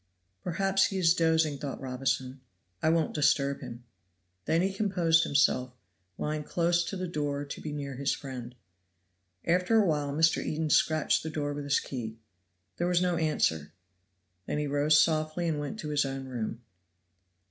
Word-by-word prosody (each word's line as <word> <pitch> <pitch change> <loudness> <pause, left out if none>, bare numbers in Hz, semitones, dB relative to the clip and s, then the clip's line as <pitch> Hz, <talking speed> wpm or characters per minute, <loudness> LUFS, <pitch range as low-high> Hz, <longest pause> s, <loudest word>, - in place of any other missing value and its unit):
"Perhaps 195 +2 +2
he 195 - -4
is 170 -3 +4
dozing," 160 -4 +2
thought 140 -1 -5
Robinson. 130 0 -2 0.4
"I - - +3
won't 165 -1 +1
disturb 140 -2 +2
him." 120 +1 -8 0.6
Then 165 +2 +2
he 190 0 0
composed 180 -5 +2
himself, 130 -3 +2 0.4
lying 150 0 -2
close 170 +2 +1
to 195 - -4
the 185 0 -3
door 145 -3 -2
to 140 - -7
be 155 - -5
near 140 -3 -5
his 140 0 0
friend. 125 -3 -6 0.9
After 180 +6 +3
a 215 - +5
while 150 -4 0
Mr. 160 +3 +2
Eden 155 0 -2
scratched 155 -2 +3
the 160 - -5
door 145 -2 -2
with 145 0 -5
his 140 0 +2
key. 115 -4 -6 0.6
There 175 - 0
was 180 -1 +3
no 180 -1 +1
answer; 80 - 0 0.7
then - - -2
he 150 - -1
rose 145 +2 +3
softly 155 +2 +1
and 155 -2 -1
went 145 +9 -5
to 150 - -5
his 145 -1 +2
own 135 -1 -4
room. 120 -2 -4
150 Hz, 170 wpm, -29 LUFS, 140-165 Hz, 0.9 s, a